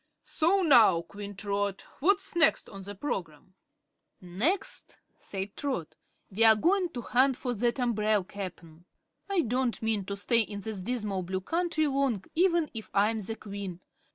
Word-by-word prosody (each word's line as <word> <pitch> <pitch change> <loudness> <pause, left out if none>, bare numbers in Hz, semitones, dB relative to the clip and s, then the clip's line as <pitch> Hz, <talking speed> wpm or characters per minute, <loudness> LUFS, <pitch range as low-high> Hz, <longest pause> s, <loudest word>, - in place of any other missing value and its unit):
"So 370 +5 +2
now, 225 - +6
Queen 200 +3 -9
Trot, 200 0 -2
what's 390 +4 +1
next 320 -2 +4
on 195 -2 -9
the 200 +2 -7
program?" 185 - -5 0.7
"Next," 220 - -2 0.2
said 195 0 -6
Trot, 260 - -3 0.4
"we're 220 +2 +6
goin' 355 - +2
to 245 - -4
hunt 260 +2 +3
for 250 -2 -2
that 240 +3 0
umbrel, 215 -4 +1
Cap'n. 180 -4 -9 0.4
I 390 -3 +2
don't 250 -2 -1
mean 220 -3 0
to 200 +1 -4
stay 230 +4 +3
in 205 -2 -1
this 215 -2 -5
dismal 210 -3 -2
Blue 185 +1 -3
Country 330 - 0
long, 270 -8 0
even 340 -2 +2
if 220 -2 -7
I 205 +2 +4
am 225 - -3
the 215 +2 -5
Queen. 200 -4 -7
220 Hz, 155 wpm, -29 LUFS, 195-275 Hz, 0.7 s, now